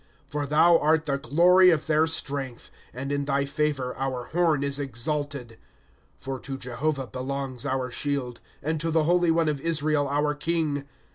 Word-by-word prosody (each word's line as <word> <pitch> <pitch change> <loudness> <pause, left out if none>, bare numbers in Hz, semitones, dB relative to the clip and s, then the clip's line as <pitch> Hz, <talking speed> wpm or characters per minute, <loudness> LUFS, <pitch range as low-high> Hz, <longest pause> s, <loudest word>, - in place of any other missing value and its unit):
" - - -35
For 145 0 -2
thou 165 +4 +5
art 160 +1 +2
the 140 -2 -1
glory 180 +7 +5
of 155 -4 +2
their 155 +1 +3
strength; 140 -6 -4 0.2
And 135 +3 -5
in 140 0 -1
thy 140 0 +1
favor 145 -3 -1
our 130 -2 -2
horn 160 -1 +1
is 140 0 0
exalted, 140 -2 -3 0.6
's - - -27
For 135 -1 -3
to 135 +1 -6
Jehovah 135 +3 -2
belongs 130 +2 -4
our 130 -2 -1
shield, 135 -3 -3 0.2
And 155 +1 -1
to 165 - 0
the 160 -1 +2
Holy 175 +1 +3
One 165 0 +2
of 145 -3 -1
Israel, 155 -3 +1
our 150 +1 +1
king. 150 -2 -1
145 Hz, 180 wpm, -26 LUFS, 135-155 Hz, 0.6 s, thou